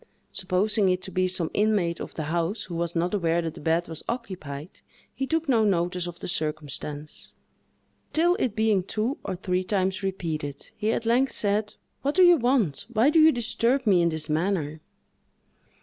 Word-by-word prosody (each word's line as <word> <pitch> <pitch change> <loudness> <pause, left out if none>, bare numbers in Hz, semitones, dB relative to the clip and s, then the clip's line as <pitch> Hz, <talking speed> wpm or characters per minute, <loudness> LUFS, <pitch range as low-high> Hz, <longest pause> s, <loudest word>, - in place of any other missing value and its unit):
Supposing 195 +2 +1
it 180 0 0
to 190 - -5
be 185 0 +1
some 180 -3 -2
inmate 205 -6 +1
of - - -7
the 160 - -3
house, 170 +7 -1
who 180 - -8
was 170 0 -2
not 175 +3 0
aware 170 -4 +1
that 165 -1 -3
the - - -11
bed 165 +3 +1
was 160 -2 -6
occupied, 180 - -6 0.3
he 270 - -3
took 325 +1 0
no 235 -5 +4
notice 180 -2 +1
of 175 -1 -7
the - - -6
circumstance, 150 -2 -4 0.8
till 340 +3 +3
it 230 -5 0
being 220 -3 +3
two 220 +8 -2
or 190 - -3
three 180 0 -1
times 190 0 0
repeated, 160 -7 -4
he 215 +1 0
at 230 - -2
length 250 +4 +2
said, 210 0 0 0.3
"What 285 +2 -1
do 370 - +6
you 350 -1 +7
want? 240 - +1
Why 235 +5 +4
do 320 - +5
you 315 0 +8
disturb 245 +1 0
me 190 -5 +5
in 170 - +3
this 160 -1 -3
manner?" 155 -1 -1
185 Hz, 185 wpm, -26 LUFS, 170-225 Hz, 0.8 s, you